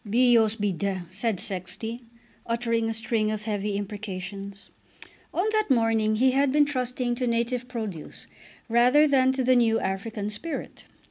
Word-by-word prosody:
"Bios 225 0 +4
be 205 -2 -1
d 190 +1 -2
," 170 - -19
said 205 0 -1
Sexty, 200 +5 -2 0.5
uttering 230 -1 0
a - - -1
string 220 -1 0
of 215 -1 -3
heavy 210 -1 -2
imprecations. 200 -1 -7 0.6
On 365 +5 0
that 430 -3 +1
morning 225 -3 +2
he 260 +4 +3
had 275 +1 +2
been 295 +1 +4
trusting 250 -3 -2
to 245 +1 -2
native 235 +1 -1
produce 220 -10 -6 0.4
rather 250 +6 +5
than 260 -2 +4
to 260 -1 -1
the 255 +1 +4
new 225 -2 +3
African 205 +2 -3
spirit. 305 +10 -6
225 Hz, 155 wpm, -26 LUFS, 205-250 Hz, 0.6 s, rather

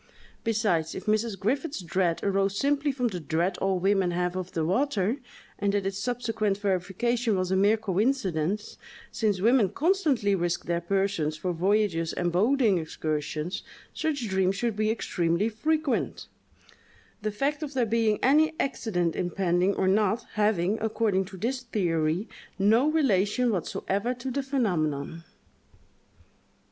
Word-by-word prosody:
Besides, 205 -8 0
if 190 - -6
Mrs. 215 -1 0
Griffiths's 270 - -1
dread 170 0 0
arose 195 0 +1
simply 285 +2 +1
from 250 -3 -1
"the 180 -4 -5
dread 170 +4 -1
all 195 -1 +1
women 195 0 +2
have 180 +1 -1
of 185 -1 -5
the 160 -2 0
water," 220 - +1 0.4
and 200 -1 +1
that 200 -1 0
its 195 0 -2
subsequent 220 -3 -1
verification 205 +4 0
was 185 0 -1
a - - +3
mere 205 +3 +4
coincidence, 205 - -1 0.3
since 205 -5 0
women 230 -2 +4
constantly 285 - +1
risk 175 -2 -1
their 170 0 -1
persons 180 -4 0
for 175 +3 -2
voyages 180 -2 +1
and 175 -1 -1
boating 215 +1 +3
excursions, 155 +2 -3 0.3
such 290 -7 -2
dreams 190 -1 +1
should 230 +1 -1
be 215 +1 +1
extremely 180 -2 0
frequent—the 275 -5 -4
fact 280 +8 -1
of 290 -3 -5
there 250 -3 +2
being 225 -1 +2
any 310 +4 +4
accident 180 -11 -1
impending 180 +1 +1
or 190 - +1
not, 210 +3 +2
having, 210 -1 +1
according 215 -3 +1
to 190 +1 -10
this 250 +7 -2
theory, 175 -5 0 0.3
no 220 +8 +4
relation 245 -5 +2
whatever 200 +5 -2
to 255 +2 -5
the 280 - -1
phenomenon. 165 - -1
200 Hz, 140 wpm, -27 LUFS, 180-235 Hz, 0.4 s, mere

